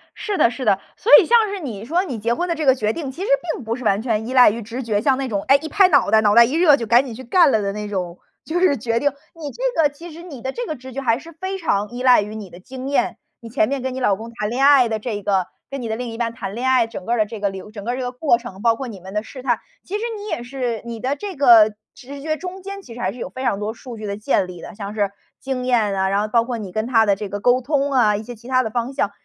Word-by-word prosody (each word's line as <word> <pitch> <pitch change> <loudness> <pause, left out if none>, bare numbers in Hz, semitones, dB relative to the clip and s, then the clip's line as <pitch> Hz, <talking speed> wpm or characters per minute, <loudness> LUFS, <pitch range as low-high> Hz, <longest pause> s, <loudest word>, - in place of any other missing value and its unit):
是 410 -3 -3
的， - - +5
是 255 +1 -6
的， 195 - +3 0.2
所 465 - -1
以 405 - +2
像 460 0 +4
是 405 - -4
你 225 - -6
说 340 +8 +1
你 265 -11 -5
结 230 +3 0
婚 350 +8 -2
的 335 - 0
这 310 - -3
个 265 -1 +6
决 215 -3 -1
定 290 -5 -5
其 325 - -10
实 400 - -2 0.3
并 - - -7
不 225 +1 -2
是 250 - -8
完 205 -2 +2
全 220 -2 -1
依 255 - -4
赖 250 -3 +8
于 230 +3 -4
直 230 +4 -6
觉， 210 -3 0
像 265 +2 +2
那 270 0 -2
种， 200 -3 -2
哎， 275 - +7
一 315 - -6
拍 390 +1 +5
脑 285 -7 +3
袋， 220 - +6
脑 210 -1 +3
袋 235 - +9
一 250 - -4
热 325 -3 +6
就 235 - -4
赶 240 +5 +4
紧 245 - -7
去 260 - -9
干 335 +4 +4
了 220 - +2
的 200 -1 -1
那 210 0 -5
种， 180 -4 -4 0.3
就 340 +2 -1
是 355 -7 +3
决 230 +1 -1
定。 285 +3 +1 0.2
你 305 -3 -6
这 - - 0
个 295 - +4
其 330 +4 -11
实 335 +2 -11
你 285 -9 -10
的 265 - -3
这 485 - -4
个 310 - -4
直 260 0 -11
觉 275 - -4
还 230 -2 +1
是 335 +3 -12
非 375 +4 -5
常 210 - -1
依 245 +1 -6
赖 250 -4 +6
于 210 +1 -6
你 210 -3 -7
的 175 - -13
经 260 +7 -7
验， 280 - 0 0.2
你 230 - -10
前 225 -1 +1
面 275 -2 -2
跟 260 0 -3
你 260 - -4
老 205 -6 +2
公 225 +3 -9
谈 210 -3 -3
恋 260 +4 +1
爱 275 -4 +6
的 220 -1 -2
这 215 -2 -4
个， 190 -3 +1 0.2
跟 275 -1 -5
你 235 - -4
的 220 - -1
另 245 +1 -5
一 225 - -7
半 235 -1 -2
谈 200 -3 -6
恋 255 +2 -2
爱， 250 -3 +3
整 185 -5 -8
个 240 +1 0
的 215 - +3
这 220 +1 -8
个 200 0 0
流 195 +2 -9
整 205 -2 -8
个 240 +3 -2
这 260 - -4
个 250 -1 -3
过 250 -1 +2
程， 215 -5 -10
包 230 0 +3
括 265 +2 -6
你 210 -5 -8
们 190 +2 -11
的 210 0 -1
试 255 +3 -10
探。 - - +1 0.2
其 390 - -6
实 420 - -2 0.2
你 415 +1 -8
也 240 - -3
是 245 -4 -3
你 235 -1 -6
的 265 +5 -1
这 395 +2 -6
个 230 -6 +6 0.2
直 275 +2 -10
觉 310 +1 -2
中 370 +2 -7
间 395 +1 -7
其 235 - -12
实 240 - -10
还 185 -4 -1
是 245 - -12
有 - - -5
非 260 0 -7
常 220 -5 0
多 210 +1 -3
数 235 0 -10
据 215 - -7
的 200 0 -4
建 205 -3 +1
立 175 -2 -10
的， - - -9
像 200 0 -6
是 205 -2 0 0.3
经 260 -2 -3
验 225 -5 +2
啊， 190 0 +1
然 200 +1 +1
后 215 - -1
包 230 +1 +3
括 240 0 -4
你 205 -4 -7
跟 215 +4 -2
他 225 -3 +4
的 200 -1 +3
这 205 0 -6
个 205 - -4
沟 245 +4 +3
通 280 +1 0
啊， 215 -5 +4
一 215 - -6
些 245 +2 -8
其 235 +2 -15
他 255 0 +2
的 220 - -3
方 240 +4 -3
向。 205 -7 0
240 Hz, 350 characters per minute, -21 LUFS, 215-275 Hz, 0.3 s, 袋